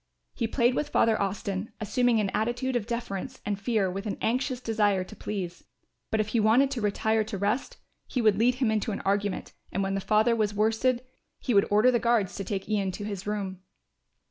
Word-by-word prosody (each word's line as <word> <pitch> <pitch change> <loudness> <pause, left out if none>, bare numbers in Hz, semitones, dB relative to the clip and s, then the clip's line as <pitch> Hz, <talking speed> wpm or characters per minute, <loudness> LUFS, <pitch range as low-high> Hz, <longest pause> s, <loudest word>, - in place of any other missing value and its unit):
He 230 - -1
played 240 +1 +2
with 295 +3 -1
Father 225 -6 +3
Austin, 200 +1 -3
assuming 240 +2 +2
an 200 -2 0
attitude 240 +4 -1
of 230 -3 -1
deference 235 +1 -4
and 205 -1 -2
fear 215 -3 +1
with 195 +3 -4
an 200 - -3
anxious 250 +2 0
desire 210 -5 +1
to - - -12
please; 185 -4 -5 0.5
but 220 - 0
if 215 0 0
he 230 - +1
wanted 235 +6 +4
to 255 -4 -2
retire 220 +1 +1
to 210 -2 -5
rest, 215 - -1 0.3
he 255 - -2
would 215 -3 +3
lead 245 +2 +4
him 250 -4 +1
into 220 +1 0
an 200 - -4
argument 200 0 -1 0.2
and 195 - -1
when 195 0 -1
the 195 - -1
father 215 +4 +3
was 210 -2 0
worsted 225 +4 +1 0.3
he 250 - -2
would 200 -1 +4
order 215 +5 +5
the 240 - +2
guards 230 -5 +2
to 195 - -3
take 195 0 -4
Ian 200 -2 0
to 205 - -6
his 200 -2 -5
room. 195 -3 -3
215 Hz, 210 wpm, -28 LUFS, 200-240 Hz, 0.5 s, order